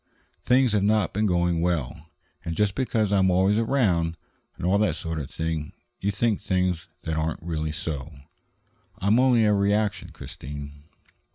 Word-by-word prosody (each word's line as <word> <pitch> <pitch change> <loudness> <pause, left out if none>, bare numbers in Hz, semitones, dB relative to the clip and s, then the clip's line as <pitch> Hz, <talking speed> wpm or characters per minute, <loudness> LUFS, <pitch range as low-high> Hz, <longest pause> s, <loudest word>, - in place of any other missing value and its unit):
Things 125 -1 +4
have 105 -1 +2
not 105 +1 +2
been 105 +2 +1
going 85 -2 +1
well, 80 -2 -2 0.3
and 85 - -4
just 105 0 +1
because 110 -5 0
I 100 - +3
am 95 0 +4
always 95 +4 +3
around, 95 -10 +1 0.4
and - - -5
all 95 +3 +3
that 95 -7 +2
sort 80 -1 -4
of 70 - -6
thing, 80 -2 -3 0.3
you 100 - -1
think 105 +1 0
things 90 -3 0 0.2
that 80 -1 -2
aren't 80 +1 -2
really 80 -2 -2
so. 75 -1 -5 0.9
I'm 105 +4 +3
only 125 -4 +4
a 105 - +4
reaction, 100 +1 +1
Christine." 70 +1 -9
90 Hz, 165 wpm, -25 LUFS, 80-105 Hz, 0.9 s, Things